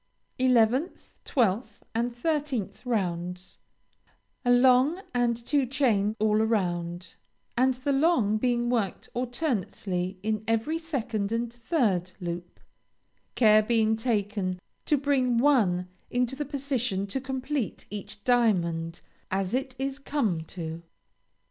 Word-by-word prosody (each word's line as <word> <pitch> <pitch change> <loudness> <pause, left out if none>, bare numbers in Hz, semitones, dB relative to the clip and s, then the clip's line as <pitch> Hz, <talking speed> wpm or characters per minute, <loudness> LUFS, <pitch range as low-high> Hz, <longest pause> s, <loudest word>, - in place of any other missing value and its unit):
11th, 255 - +2
12th, 225 -2 0
and 235 +2 0
13th 270 - -2
rounds 180 -5 -2 0.8
A 245 - 0
long 255 +6 +5
and 240 -1 +2
two 260 +3 0
chain 225 -6 +2
all 215 0 +2
round, 180 -5 -1 0.4
and 260 +1 +3
the 265 +3 -2
long 270 -8 +3
being 240 +1 +1
worked 230 -6 -1
alternately 210 - -2
in 215 0 -1
every 225 +9 0
second 235 -10 -2
and 230 0 -1
third 225 - 0
loop; 175 -1 -6 0.8
care 215 -3 +6
being 220 0 +2
taken 205 -5 -1 0.3
to 295 - +4
bring 260 -3 +2
one 215 -10 +3 0.2
into 250 +1 0
the 295 +2 -3
position 260 -8 -1
to 230 +7 -3
complete 265 -1 -3
each 205 0 -8
diamond 170 -9 +1 0.3
as 190 +1 -1
it 260 0 -1
is 270 +1 -3
come 260 - 0
to. 165 -1 -6
230 Hz, 115 wpm, -27 LUFS, 200-260 Hz, 0.8 s, care